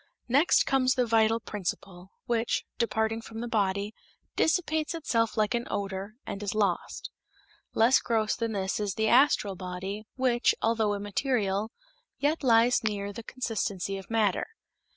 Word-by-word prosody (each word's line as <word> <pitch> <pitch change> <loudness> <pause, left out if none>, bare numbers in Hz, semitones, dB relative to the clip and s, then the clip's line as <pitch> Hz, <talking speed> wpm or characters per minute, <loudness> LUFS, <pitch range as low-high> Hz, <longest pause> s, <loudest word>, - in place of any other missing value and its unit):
Next 280 +8 +4
comes 260 -1 +2
the 250 -2 +2
vital 225 0 +3
principle, 190 -3 -5 0.2
which, 235 -1 0
departing 225 -1 0
from 225 0 -9
the 240 - -3
body, 200 -1 0 0.4
dissipates 315 -1 +1
itself 230 -9 0
like 215 +2 +2
an 240 0 -1
odor, 195 +1 -4
and 195 - -5
is 205 0 -3
lost. 210 - -1 0.6
Less 230 +4 +5
gross 220 -2 0
than 230 -2 -2
this 190 0 -1
is 205 -2 -2
the 220 0 +1
astral 240 -6 +4
body, 190 +3 -6
which, 250 -2 +2
although 220 -2 +1
immaterial, 205 0 -1 0.5
yet 295 +3 0
lies 240 -1 +4
near 205 -2 -1
to - - -8
the 230 - -7
consistency 205 -6 -3
of 190 - -13
matter. 215 -4 +1
220 Hz, 150 wpm, -28 LUFS, 200-240 Hz, 0.6 s, Less